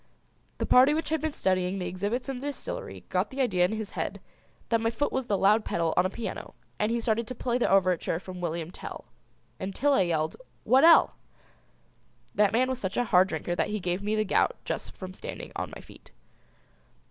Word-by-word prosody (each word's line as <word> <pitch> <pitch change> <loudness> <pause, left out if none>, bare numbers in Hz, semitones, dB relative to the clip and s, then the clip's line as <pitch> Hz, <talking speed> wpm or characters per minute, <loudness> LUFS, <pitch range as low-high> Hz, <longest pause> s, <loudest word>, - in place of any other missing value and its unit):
The - - -1
party 265 +4 +6
which 320 -1 -2
had 320 0 0
been 315 0 -1
studying 185 -5 0
the 180 - -3
exhibits 205 +9 -2
in 270 -2 -3
the 275 +3 -5
distillery 290 - -6
got - - 0
the 270 - -8
idea 185 -9 +3
in 180 - -1
his 220 -1 -4
head - - -4 0.5
that 230 -1 +2
my 225 - +2
foot 235 +6 -1
was 260 -2 -2
the 205 - +1
loud 210 +3 +4
pedal 165 -4 0
on 180 +1 +4
a - - -7
piano 230 +4 -6 0.2
and 210 +2 +1
he 235 - +1
started 225 0 0
to 255 - -6
play 245 +1 -1
the - - +2
overture 185 -4 +2
from 180 0 -9
William 170 -1 -3
Tell - - -8 0.5
until 200 +10 0
I 195 - +4
yelled 160 -3 0 0.3
"W'at'ell!" 320 +6 +7 1.2
That 205 -1 +3
man 245 +4 +2
was 260 -1 -2
such 190 -5 -3
a 245 - +3
hard 185 -3 +5
drinker 165 0 -3
that - - 0
he 210 0 -2
gave 180 0 -2
me 210 +1 -1
the 215 0 +1
gout - - +2
just - - -4
from 185 -1 -7
standing - - -7
on - - -4
my - - -9
feet. - - -16
210 Hz, 210 wpm, -28 LUFS, 185-250 Hz, 1.2 s, W'at'ell